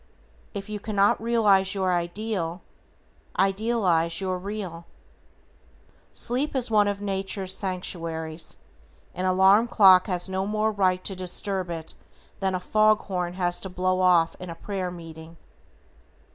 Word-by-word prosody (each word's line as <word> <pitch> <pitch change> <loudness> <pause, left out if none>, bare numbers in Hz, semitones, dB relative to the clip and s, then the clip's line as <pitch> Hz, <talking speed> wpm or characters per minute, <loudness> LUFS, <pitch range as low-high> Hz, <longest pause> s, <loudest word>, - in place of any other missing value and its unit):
If 200 -1 -5
you 210 -1 -5
cannot 205 -1 +1
realize 205 -5 +3
your 190 -2 +1
ideal, 175 0 -3 0.7
idealize 195 -5 +1
your 185 -2 -2
real. 185 -4 -6 1.2
Sleep 265 +5 -2
is 250 -3 -1
one 210 -1 +4
of 200 0 -2
Nature's 195 -1 -1
sanctuaries; 165 -4 -3 0.6
an 185 - -3
alarm 190 +5 +5
clock 190 -5 +6
has 180 -2 0
no 190 +1 -2
more 215 +1 0
right 185 -3 +1
to 195 - -2
disturb 185 0 -2
it 165 -2 -6 0.5
than 190 -1 0
a - - -1
fog 215 +3 +3
horn 180 -3 -3
has 175 -1 -1
to 190 - -6
blow 185 0 0
off 175 -3 +3
in 180 - -7
a 165 - -6
prayer 190 0 -4
meeting. 165 -1 -11
190 Hz, 135 wpm, -25 LUFS, 180-205 Hz, 1.2 s, clock